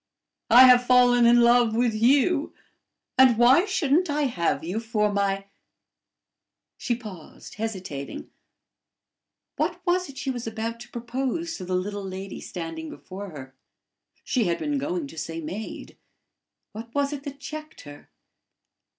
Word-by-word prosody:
I 245 Hz, +3 st, +9 dB
have 250 Hz, -1 st, +6 dB
fallen 245 Hz, -1 st, +5 dB
in 240 Hz, 0 st, +6 dB
love 235 Hz, -1 st, +4 dB
with 235 Hz, -1 st, +2 dB
you; 280 Hz, +8 st, +2 dB, 0.6 s
and 255 Hz, -3 st, +6 dB
why 255 Hz, -, +5 dB
shouldn't 350 Hz, -3 st, +1 dB
I 295 Hz, +1 st, 0 dB
have 170 Hz, -, -1 dB
you 180 Hz, +7 st, -3 dB
for 215 Hz, -2 st, 0 dB
my 195 Hz, -1 st, 0 dB, 0.6 s
" -, -, -62 dB
She 240 Hz, -, -1 dB
paused, 210 Hz, -9 st, -11 dB
hesitating: 190 Hz, -10 st, -6 dB, 1.3 s
what -, -, -1 dB
was 360 Hz, -1 st, +1 dB
it 275 Hz, -, -12 dB
she 275 Hz, -1 st, -2 dB
was 245 Hz, -2 st, -6 dB
about 225 Hz, +1 st, -4 dB
to 240 Hz, 0 st, -11 dB
propose 260 Hz, +8 st, -3 dB
to 185 Hz, -, -7 dB
the 185 Hz, 0 st, -2 dB
little 200 Hz, +3 st, -3 dB
lady 190 Hz, 0 st, -7 dB
standing 165 Hz, -2 st, -6 dB
before 195 Hz, +2 st, -9 dB
her? 130 Hz, -5 st, -10 dB, 0.7 s
She 245 Hz, -4 st, 0 dB
had 170 Hz, -2 st, 0 dB
been 295 Hz, -2 st, -2 dB
going 320 Hz, +3 st, -3 dB
to 165 Hz, -, -9 dB
say 165 Hz, +1 st, -5 dB
maid: 180 Hz, +8 st, -7 dB, 0.7 s
what 230 Hz, +3 st, -10 dB
was 285 Hz, 0 st, 0 dB
it 285 Hz, -, -5 dB
that 280 Hz, -1 st, -7 dB
checked 310 Hz, +1 st, -8 dB
her? 145 Hz, 0 st, -13 dB
235 Hz, 150 wpm, -25 LUFS, 195-270 Hz, 1.3 s, I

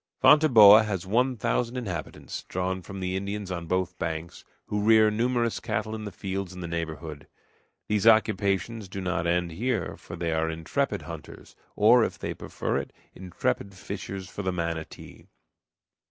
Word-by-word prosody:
Fonteboa 115 Hz, -9 st, +8 dB
has 95 Hz, -4 st, -3 dB
one 125 Hz, +6 st, +1 dB
thousand 115 Hz, +2 st, -1 dB
inhabitants, 90 Hz, -, -5 dB
drawn 95 Hz, 0 st, -2 dB
from 95 Hz, +2 st, -8 dB
the 90 Hz, 0 st, -2 dB
Indians 100 Hz, 0 st, -4 dB
on 85 Hz, -2 st, -4 dB
both 90 Hz, +1 st, -1 dB
banks, 80 Hz, 0 st, -4 dB, 0.2 s
who 105 Hz, 0 st, -2 dB
rear 110 Hz, 0 st, +5 dB
numerous 120 Hz, +1 st, 0 dB
cattle 110 Hz, -, -3 dB
in 110 Hz, -1 st, -5 dB
the 105 Hz, -, -5 dB
fields 95 Hz, 0 st, -4 dB
in 90 Hz, -, -8 dB
the 85 Hz, -, -4 dB
neighborhood. 80 Hz, -3 st, -5 dB, 0.6 s
These 105 Hz, +1 st, +1 dB
occupations 105 Hz, -1 st, +2 dB
do 95 Hz, -, -6 dB
not 90 Hz, -2 st, -1 dB
end 85 Hz, 0 st, +1 dB
here, 110 Hz, +1 st, -2 dB
for -, -, -9 dB
they 85 Hz, -1 st, -2 dB
are 80 Hz, 0 st, 0 dB
intrepid 80 Hz, 0 st, -2 dB
hunters, -, -, -10 dB, 0.2 s
or, 115 Hz, +3 st, +6 dB
if -, -, -2 dB
they -, -, -4 dB
prefer -, -, -3 dB
it, -, -, -4 dB, 0.2 s
intrepid 95 Hz, +1 st, -3 dB
fishers 95 Hz, 0 st, -6 dB
for 100 Hz, -, -6 dB
the 95 Hz, -1 st, -1 dB
manatee. 85 Hz, -2 st, -5 dB
95 Hz, 160 wpm, -27 LUFS, 85-110 Hz, 0.6 s, Fonteboa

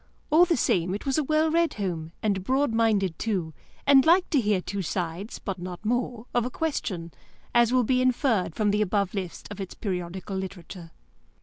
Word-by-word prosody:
All 330 Hz, +4 st, +7 dB
the 335 Hz, -3 st, +1 dB
same, 180 Hz, -4 st, +1 dB
it 205 Hz, -, -7 dB
was 275 Hz, +2 st, +1 dB
a -, -, +1 dB
well 310 Hz, +2 st, +2 dB
read 335 Hz, 0 st, +2 dB
home, 170 Hz, -6 st, -3 dB
and 200 Hz, -3 st, 0 dB
broad 265 Hz, +3 st, +1 dB
minded, 210 Hz, -6 st, +1 dB
too, 185 Hz, -8 st, -2 dB, 0.3 s
and 275 Hz, -1 st, +7 dB
liked 355 Hz, +4 st, +4 dB
to 285 Hz, -, +4 dB
hear 210 Hz, -3 st, +2 dB
two 195 Hz, +2 st, -4 dB
sides 180 Hz, +3 st, -4 dB
(but 195 Hz, -3 st, -5 dB
not 180 Hz, +3 st, -7 dB
more) 245 Hz, 0 st, -1 dB
of 240 Hz, -, +2 dB
a 250 Hz, -, -2 dB
question, 200 Hz, -, -3 dB, 0.4 s
as 240 Hz, -1 st, +4 dB
will 255 Hz, -1 st, +4 dB
be 255 Hz, +2 st, +2 dB
inferred 245 Hz, -, +1 dB
from 210 Hz, -2 st, +2 dB
the 210 Hz, +1 st, +1 dB
above 200 Hz, -1 st, 0 dB
list 190 Hz, -4 st, -5 dB
of 205 Hz, 0 st, -6 dB
its 190 Hz, -, -7 dB
periodical 185 Hz, 0 st, -4 dB
literature. 180 Hz, -2 st, -7 dB
210 Hz, 195 wpm, -26 LUFS, 185-255 Hz, 0.4 s, All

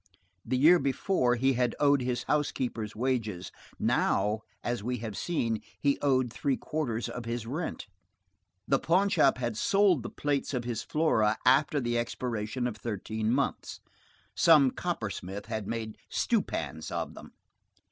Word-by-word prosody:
The 130 Hz, +3 st, -1 dB
year 165 Hz, +7 st, +6 dB
before 135 Hz, -1 st, +1 dB
he 135 Hz, +3 st, +2 dB
had 125 Hz, 0 st, 0 dB
owed 140 Hz, -2 st, +4 dB
his 125 Hz, -1 st, -1 dB
housekeeper's 125 Hz, -7 st, -1 dB
wages; 110 Hz, -6 st, -2 dB, 0.3 s
now, 105 Hz, +1 st, +1 dB, 0.2 s
as 120 Hz, -3 st, -2 dB
we 125 Hz, +4 st, -2 dB
have 110 Hz, -3 st, -6 dB
seen, 115 Hz, -, -1 dB, 0.2 s
he 140 Hz, -1 st, +1 dB
owed 130 Hz, -4 st, +2 dB
three 135 Hz, +3 st, 0 dB
quarters 120 Hz, -7 st, -2 dB
of 125 Hz, -2 st, -6 dB
his 115 Hz, -1 st, -3 dB
rent. 150 Hz, +9 st, -4 dB, 0.8 s
The 135 Hz, -, +3 dB
pawnshop 180 Hz, -6 st, +3 dB
had 120 Hz, -3 st, -2 dB
sold 195 Hz, -, +3 dB
the 120 Hz, -, -6 dB
plates 145 Hz, -1 st, -1 dB
of 125 Hz, -, -1 dB
his 120 Hz, -2 st, -3 dB
Flora 110 Hz, -9 st, +2 dB
after 145 Hz, +3 st, +4 dB
the 120 Hz, -2 st, 0 dB
expiration 120 Hz, 0 st, -3 dB
of 120 Hz, -3 st, -3 dB
thirteen 110 Hz, 0 st, -3 dB
months. 140 Hz, +3 st, -1 dB, 0.6 s
Some 155 Hz, -7 st, +6 dB
coppersmith 100 Hz, -, -4 dB
had 110 Hz, -2 st, -4 dB
made 110 Hz, -2 st, -4 dB
stewpans 80 Hz, 0 st, -1 dB
of -, -, -3 dB
them. -, -, -12 dB
125 Hz, 145 wpm, -29 LUFS, 110-140 Hz, 0.8 s, year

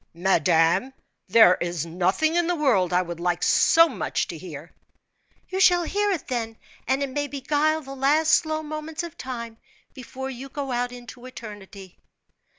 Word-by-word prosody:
"Madame, 170 Hz, -, +2 dB, 0.4 s
there 195 Hz, -2 st, +6 dB
is 175 Hz, -2 st, -2 dB
nothing 185 Hz, -, 0 dB
in 345 Hz, 0 st, +1 dB
the 355 Hz, -, +1 dB
world 230 Hz, -, +2 dB
I 180 Hz, +1 st, +2 dB
would 170 Hz, -1 st, -7 dB
like 175 Hz, 0 st, -1 dB
so 330 Hz, 0 st, +5 dB
much -, -, -2 dB
to -, -, -6 dB
hear." -, -, -10 dB, 0.8 s
"You 375 Hz, +1 st, -3 dB
shall 355 Hz, -2 st, +5 dB
hear 410 Hz, +4 st, 0 dB
it, 365 Hz, -7 st, -2 dB
then, 225 Hz, -3 st, -3 dB, 0.3 s
and 265 Hz, +3 st, +1 dB
it 275 Hz, -, -3 dB
may 290 Hz, +2 st, -2 dB
beguile 295 Hz, +3 st, 0 dB
the 270 Hz, 0 st, -9 dB
last 295 Hz, +4 st, +2 dB
slow 315 Hz, 0 st, +1 dB
moments 310 Hz, +1 st, -5 dB
of 340 Hz, -1 st, -8 dB
time 235 Hz, -5 st, -7 dB, 0.3 s
before 265 Hz, +1 st, -7 dB
you 265 Hz, +2 st, -9 dB
go 275 Hz, -1 st, -5 dB
out 245 Hz, 0 st, -1 dB
into 245 Hz, 0 st, -11 dB
eternity." 205 Hz, -6 st, -11 dB
260 Hz, 165 wpm, -24 LUFS, 195-310 Hz, 0.8 s, there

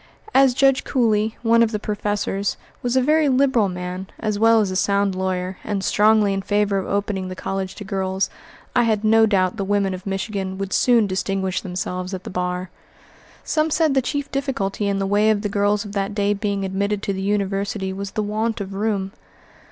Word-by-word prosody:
As 265 Hz, -2 st, +5 dB
Judge 270 Hz, 0 st, +3 dB
Cooley, 220 Hz, -4 st, +1 dB
one 230 Hz, 0 st, +4 dB
of 230 Hz, -1 st, +3 dB
the 215 Hz, -, -1 dB
professors, 205 Hz, -1 st, -2 dB, 0.2 s
was 245 Hz, 0 st, -1 dB
a 260 Hz, -, +4 dB
very 305 Hz, +1 st, +3 dB
liberal 255 Hz, -6 st, +3 dB
man, 180 Hz, +1 st, -5 dB
as 215 Hz, -2 st, -2 dB
well 225 Hz, 0 st, +5 dB
as 205 Hz, -3 st, +1 dB
a -, -, -3 dB
sound 200 Hz, 0 st, +1 dB
lawyer, 185 Hz, 0 st, -2 dB
and 200 Hz, -2 st, -2 dB
strongly 210 Hz, -1 st, +3 dB
in 195 Hz, -, -1 dB
favor 205 Hz, 0 st, +1 dB
of 190 Hz, -, -5 dB
opening 200 Hz, -1 st, -1 dB
the 185 Hz, -, -6 dB
college 190 Hz, 0 st, -4 dB
to 205 Hz, -, -8 dB
girls, 190 Hz, -1 st, -1 dB, 0.5 s
I 245 Hz, -, +5 dB
had 220 Hz, -3 st, +1 dB
no 220 Hz, +1 st, +5 dB
doubt 190 Hz, -1 st, +1 dB
the 200 Hz, -, -1 dB
women 200 Hz, -1 st, +1 dB
of 185 Hz, +1 st, -8 dB
Michigan 195 Hz, -1 st, -3 dB
would 195 Hz, -1 st, -4 dB
soon 240 Hz, -3 st, +4 dB
distinguish 190 Hz, -1 st, -1 dB
themselves 185 Hz, 0 st, -4 dB
at 185 Hz, -, -8 dB
the -, -, -7 dB
bar. 180 Hz, 0 st, -3 dB, 0.7 s
Some 310 Hz, 0 st, +1 dB
said 310 Hz, -1 st, +2 dB
the 265 Hz, -, +3 dB
chief 285 Hz, +3 st, -3 dB
difficulty 220 Hz, -8 st, -2 dB
in 200 Hz, -1 st, 0 dB
the 195 Hz, -, -1 dB
way 205 Hz, +2 st, +3 dB
of 210 Hz, -1 st, +1 dB
the 205 Hz, -, -1 dB
girls 205 Hz, +1 st, +1 dB
of 205 Hz, -, -7 dB
that 200 Hz, 0 st, -2 dB
day 205 Hz, 0 st, +2 dB
being 200 Hz, -1 st, -2 dB
admitted 200 Hz, +2 st, -1 dB
to 200 Hz, -, -1 dB
the 190 Hz, -, -4 dB
University 195 Hz, -1 st, -1 dB
was 200 Hz, +1 st, -5 dB
the 215 Hz, -, -1 dB
want 220 Hz, +2 st, -1 dB
of 195 Hz, -1 st, -5 dB
room. 200 Hz, -1 st, -1 dB
200 Hz, 205 wpm, -22 LUFS, 190-220 Hz, 0.7 s, As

